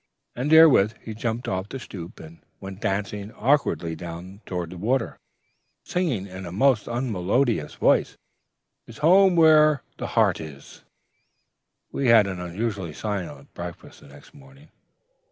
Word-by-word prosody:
"And 135 +5 -2
therewith 155 -10 +7
he 110 - -8
jumped 115 +2 -4
off 95 +2 -3
the - - -6
stoop, 90 -9 -9
and 80 +1 -13 0.2
went 95 +1 -9
dancing 100 0 -3
awkwardly 120 - 0
down 90 +4 -9
toward 90 -2 -4
the 90 - -9
water, 125 +7 -1 0.6
singing 155 - -2
in 95 -1 -9
a - - -7
most 120 +3 +2
unmelodious 115 - -1
voice, - - +2 0.7
''Tis 115 - -12
home 190 +2 +6
where'er 155 -3 +5
the - - -4
heart - - +3
is.'... 75 -3 -11 1.1
"We 135 - -1
had 115 -3 +6
an 95 -2 -5
unusually 95 -1 -4
silent 100 -1 -6
breakfast 85 0 -9
the - - -17
next 70 - -16
morning. 140 +1 -18
105 Hz, 140 wpm, -24 LUFS, 90-135 Hz, 1.1 s, therewith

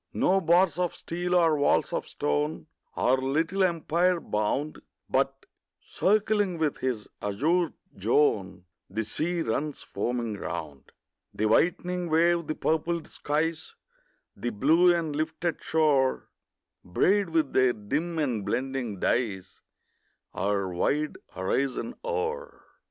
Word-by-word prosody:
No 195 +1 +3
bars 175 +1 +3
of 180 -2 0
steel 175 +1 -2
or 165 -3 +4
walls 145 - +2
of - - -2
stone 75 +3 -1 0.3
Our 130 +2 +3
little 160 +9 0
empire 175 0 +2
bound, 130 +6 -2 0.3
But, - - 0 0.3
circling 205 -2 +1
with 155 -3 -1
his 125 -5 -2
azure 160 - +1 0.3
zone, 100 -6 +1 0.2
The 110 +4 -2
sea 165 +10 -1
runs 145 +6 -2
foaming 120 -3 -3
round; 70 -2 -6 0.4
The 110 - 0
whitening 175 +8 +1
wave, 170 0 +3
the 155 - -2
purpled 165 +1 -1
skies, 160 +2 -2 0.6
The 120 - -3
blue 160 - +4
and 165 -4 -1
lifted 160 +2 -2
shore, 145 -5 +2 0.5
Braid 190 - +2
with 160 -4 0
their 130 -1 +4
dim 150 +11 -3
and 125 -9 0
blending 125 -4 -2
dyes 95 -6 -1 0.7
Our 100 0 0
wide 150 +12 0 0.2
horizon 135 - -1
o'er. 480 +1 -3
155 Hz, 120 wpm, -27 LUFS, 115-175 Hz, 0.7 s, or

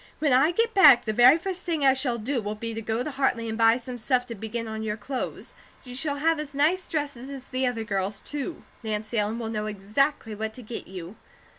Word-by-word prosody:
When 295 -4 +2
I 270 +5 +5
get 455 +6 +1
back, 290 -11 +8
the 215 - -1
very 245 +7 +7
first 370 +2 -4
thing 320 -5 -1
I 265 - +7
shall 260 -3 0
do 240 +3 -2
will 210 0 -4
be 230 +1 -5
to 225 - -4
go 225 +2 -1
to 305 - -4
Hartley 260 -4 0
and 220 - -3
buy 225 0 +5
some 250 0 -7
stuff 250 +2 +1
to 240 - -7
begin 225 +2 -5
on 220 0 -5
your 215 -1 -2
clothes. 260 +2 -5 0.3
You 250 - -9
shall 285 +3 +1
have 320 +2 +1
as 290 -2 -6
nice 330 +6 +2
dresses 285 -4 -3
as 270 -2 -8
the 255 0 0
other 235 -3 -2
girls, 200 -1 -2
too. 295 +3 -6 0.2
Nancy 215 0 -2
Ellen 210 +2 -1
will 230 -2 -4
know 215 -1 -2
exactly 215 +4 -1
what 220 +1 -4
to 250 - -9
get 230 +2 -7
you." 185 +2 -9
245 Hz, 240 wpm, -26 LUFS, 220-285 Hz, 0.3 s, back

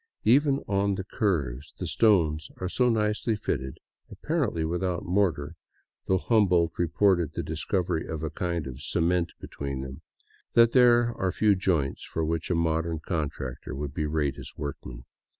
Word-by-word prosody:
Even 140 +3 +4
on 100 0 +1
the 95 - -4
curves, 75 - -2
the - - -4
stones 80 -8 +2
are 95 - -3
so 125 +6 +2
nicely 110 0 +1
fitted, 65 -10 -3 0.3
apparently 135 - -1
without 90 +3 -2
mortar 85 -6 0 0.3
— - - -48
though 95 - +3
Humboldt 90 -6 +3
reported 85 -1 +2
the - - -3
discovery 80 +1 -1
of 80 -1 -4
a 80 - -2
kind 85 -1 -2
of 65 0 -8
cement 85 +2 0
between 70 -2 -5
them 65 0 -8 0.3
— - - -35
that 115 -1 +6
there 120 -1 +5
are 95 -4 -1
few 105 +1 +3
joints 85 -7 0
for 80 - -2
which 80 0 -2
a 90 - +2
modern 80 0 0
contractor 70 -6 -4
would 70 0 -4
berate 75 -2 -1
his - - -10
workmen. 65 -4 -6
85 Hz, 160 wpm, -27 LUFS, 75-100 Hz, 0.3 s, that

